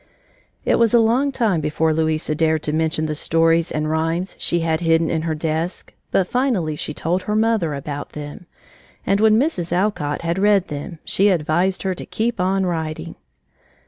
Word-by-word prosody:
It - - +2
was 230 0 +4
a - - +7
long 245 +5 +2
time 220 -11 +1
before 155 +1 +1
Louisa 155 0 0
dared 160 0 +1
to 150 - -2
mention 160 0 0
the 155 - -2
stories 165 +2 +2
and 155 0 -1
rhymes 165 +4 -1
she 170 - 0
had 160 -1 0
hidden 165 -1 +2
in 160 - 0
her 160 -1 -2
desk 160 +3 -3 0.2
but 185 - +1
finally 225 - 0
she 150 - -4
told 170 +4 -1
her 210 +3 -2
mother 215 -9 +1
about 145 +1 -6
them, 150 +3 -8 0.6
and 200 - +2
when 215 0 +5
Mrs. 240 - -1
Alcott 175 -6 -1
had 170 +2 -1
read 200 -2 +3
them, 150 +3 -6
she 200 - +2
advised 175 +2 +1
her 190 -1 0
to - - -8
keep 230 -1 -2
on 190 +1 +1
writing. 160 -3 -3
165 Hz, 180 wpm, -21 LUFS, 155-195 Hz, 0.6 s, a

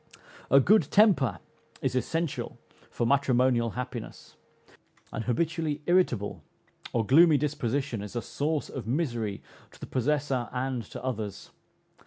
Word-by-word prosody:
A 135 - +7
good 210 +11 +4
temper 200 - +4 0.4
is 130 - -1
essential 145 0 -2 0.3
for 120 - -2
matrimonial 125 -3 +2
happiness. 125 -2 -7 0.8
An 115 - -3
habitually 150 +4 -1
irritable 175 - +1 0.5
or 115 -2 0
gloomy 155 +5 +6
disposition 140 -4 -2
is 105 +3 -8
a 120 - -1
source 150 +1 -2
of 130 -4 -7
misery 120 -7 -2 0.3
to - - -19
the - - -6
possessor 135 -1 -1
and 130 -1 -2
to - - -9
others. 110 -6 -4
130 Hz, 125 wpm, -28 LUFS, 120-150 Hz, 0.8 s, A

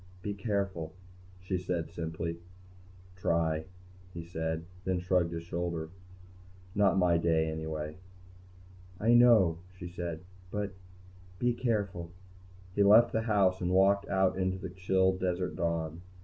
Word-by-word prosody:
"Be 105 - -2
careful," 100 -6 -2 0.5
she 90 0 -2
said 90 -2 -3
simply. 85 0 -4 0.8
"Try," 80 -3 0 0.5
he 85 - -5
said. 80 -1 -3 0.2
Then 95 0 0
he 90 - -2
shrugged. 90 -1 +1 1.4
"Not 100 -1 +3
my 90 -2 +4
day, 80 -1 +2
anyway." 80 0 -4 1.0
"I 115 +3 +4
know," 110 -9 +6 0.2
she 90 - -7
said. 85 -2 -5 0.3
"But 105 0 -3 0.7
be 120 +3 +1
careful." 100 -8 -1 0.6
He 100 - +1
left 110 +4 +7
the 110 - +1
house 100 -4 +2
and 90 - 0
walked 100 +1 +4
out 95 -1 +2
into 95 0 0
the 95 -1 -6
chill 95 0 +2
desert 90 -1 -2
dawn. 85 -2 -2
90 Hz, 125 wpm, -31 LUFS, 85-100 Hz, 1.4 s, left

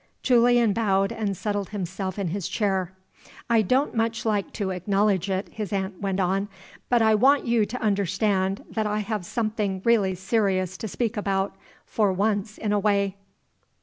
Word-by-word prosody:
Julian 240 -3 +4
bowed, 195 -3 +1
and 200 -4 -2
settled 205 -1 -2
himself 190 -1 -4
in 195 -4 -1
his 190 +1 -3
chair. 190 -4 -1 0.6
"I 230 -1 +5
don't 255 +8 +1
much 225 0 -1
like 210 -3 0
to 195 -3 -2
acknowledge 195 +1 +1
it," 190 +1 -2
his 210 -4 -6
aunt 190 -1 -3
went 195 -1 -1
on. 195 +2 0 0.4
"But 240 -2 +4
I 220 0 +5
want 265 +6 +4
you 235 -3 +2
to 250 - -5
understand 195 -1 0
that 220 -1 -1
I 210 0 -1
have 210 -3 -3
something 215 -4 -1
really 205 -5 +3
serious 190 -2 0
to 220 - -5
speak 230 +2 -2
about, 195 -1 -1 0.3
for 210 -3 +1
once 205 +2 -1
in 210 -2 -1
a 205 - +2
way. 200 -1 +1
205 Hz, 170 wpm, -25 LUFS, 190-220 Hz, 0.6 s, I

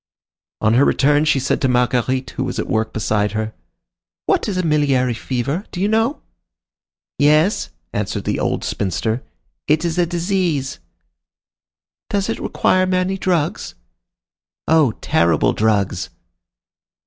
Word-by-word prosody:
On 110 0 +3
her 125 +4 +5
return, 145 +2 +3
she 150 -3 +3
said 130 - -1
to 135 - +2
Marguerite, 125 +1 +1
who - - -3
was - - -4
at - - -1
work 110 0 -1
beside 105 -1 0
her:— 110 0 -3 0.7
"What - - +1
is 190 - -2
a 185 - 0
miliary 140 -6 +2
fever? 135 - -3
Do 180 - -6
you 195 - +2
know?" 225 +7 0 1.0
"Yes," 155 +7 +3 0.2
answered 105 0 -2
the - - -1
old - - -1
spinster; 110 +5 -2 0.5
"it 155 +3 +2
is 170 +1 -1
a 175 - +3
disease." 170 -6 -1 1.3
"Does 200 -1 -1
it - - -2
require 185 0 +1
many 185 +1 0
drugs?" 180 -5 -1 0.9
"Oh! 155 -7 +4
terrible 85 -2 +2
drugs." 100 -4 0
140 Hz, 135 wpm, -19 LUFS, 110-175 Hz, 1.3 s, her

